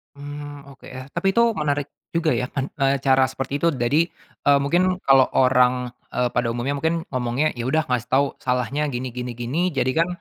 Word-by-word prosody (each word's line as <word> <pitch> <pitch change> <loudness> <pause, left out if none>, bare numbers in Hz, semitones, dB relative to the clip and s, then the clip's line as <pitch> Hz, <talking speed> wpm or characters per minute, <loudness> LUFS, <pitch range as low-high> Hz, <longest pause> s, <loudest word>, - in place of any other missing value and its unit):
Mmm, 145 0 -9
oke 135 - -15
yah 130 +1 -8
tapi 195 +6 0
itu 235 - +4 0.2
menarik 145 -2 -1 0.2
juga 165 -1 +1
ya 125 - -1
kan 135 +2 -4 0.3
cara 135 -1 +4
seperti 135 +2 -3
itu 170 - +1
jadi, 130 +3 +1 0.5
eee, 140 0 +6
mungkin 180 +5 +1
kalau 135 -1 +5
orang, 125 -1 +3 0.2
eee, 125 0 +1
pada 120 -1 -1
umumnya 130 +4 -2
mungkin 160 +3 0
ngomongnya 130 +3 0
ya 120 - -3
udah 155 +4 0
ngasih 125 -1 -1
tahu 140 +2 +5
salahnya 125 +4 -1
gini 125 +1 -3
gini 125 0 -5
gini 140 +10 -1
jadi 130 -2 0
kan, 165 +1 +3
135 Hz, 190 wpm, -22 LUFS, 125-145 Hz, 0.5 s, eee